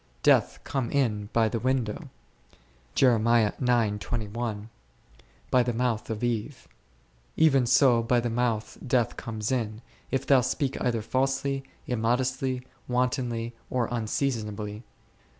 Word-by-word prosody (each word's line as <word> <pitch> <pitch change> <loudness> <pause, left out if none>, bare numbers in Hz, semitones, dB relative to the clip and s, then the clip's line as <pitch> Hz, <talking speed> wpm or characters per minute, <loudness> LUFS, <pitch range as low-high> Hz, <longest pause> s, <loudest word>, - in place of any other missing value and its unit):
Death - - +4
came 130 -4 -2
in 105 -7 0
by 115 -1 +3
the 115 +1 -2
window 125 -3 -1 0.9
n, 115 -2 +1 0.9
by 125 -1 +5
the 120 0 -1
mouth 120 -2 -1
of 110 0 -4
Eve; 120 +2 -2 0.7
even 135 -6 +4
so 125 -2 +5
by 120 +1 +2
thy 120 0 -1
mouth 115 -2 -1
death 120 -2 +1
comes 110 -1 -4
in, 115 -3 -2 0.3
if 135 - -1
thou 135 -2 +5
speak 130 +2 -1
either 115 -3 0
falsely, 135 +2 0 0.2
immodestly, 125 +2 0 0.2
wantonly, 125 -2 -1 0.2
or 125 -3 0
unseasonably. 110 -3 -2
120 Hz, 115 wpm, -27 LUFS, 110-130 Hz, 0.9 s, by